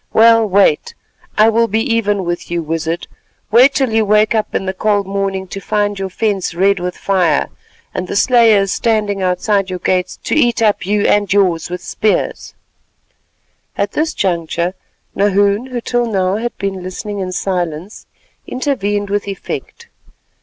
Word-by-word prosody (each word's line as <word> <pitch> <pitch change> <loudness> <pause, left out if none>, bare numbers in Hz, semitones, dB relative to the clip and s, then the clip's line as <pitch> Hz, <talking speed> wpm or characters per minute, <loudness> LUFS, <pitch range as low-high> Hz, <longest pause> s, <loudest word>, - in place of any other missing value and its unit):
Well, 230 0 +5
wait, 190 -5 +2 0.4
I 215 +1 +6
will 230 +1 +2
be 220 +1 0
even 205 -4 0
with 175 0 -4
you, 170 -1 -2
Wizard; 165 +2 -3 0.5
wait 255 +5 +6
till 265 -4 +1
you 225 0 +3
wake 215 +1 +3
up 220 -1 -1
in - - -1
the 190 - -2
cold 205 0 0
morning 195 -1 -2
to 195 - -6
find 205 0 -1
your 195 0 -3
fence 195 -3 -2
red 195 +2 +2
with 180 0 -4
fire, 185 -4 +1 0.4
and 185 - -3
the - - -4
slayers 220 -4 +4
standing 210 -3 0
outside 190 +2 0
your 185 - -3
gates 180 0 -1
to - - -2
eat 240 -6 +2
up 210 -4 +1
you 205 0 +1
and 205 -1 +2
yours 185 -5 +2
with 180 +1 -6
spears——" 215 -1 -1 1.2
At - - 0
this 315 +1 -1
juncture 170 -1 -1 0.4
Nahoon, 200 +3 +2
who 250 -2 -4
till 240 0 -1
now 190 -2 0
had 240 +2 -4
been 195 -1 -3
listening 200 +3 -6
in 185 -1 -3
silence, 180 0 -3 0.4
intervened 205 -7 -2
with 205 0 -1
effect. 330 - -6
200 Hz, 160 wpm, -16 LUFS, 185-220 Hz, 1.2 s, I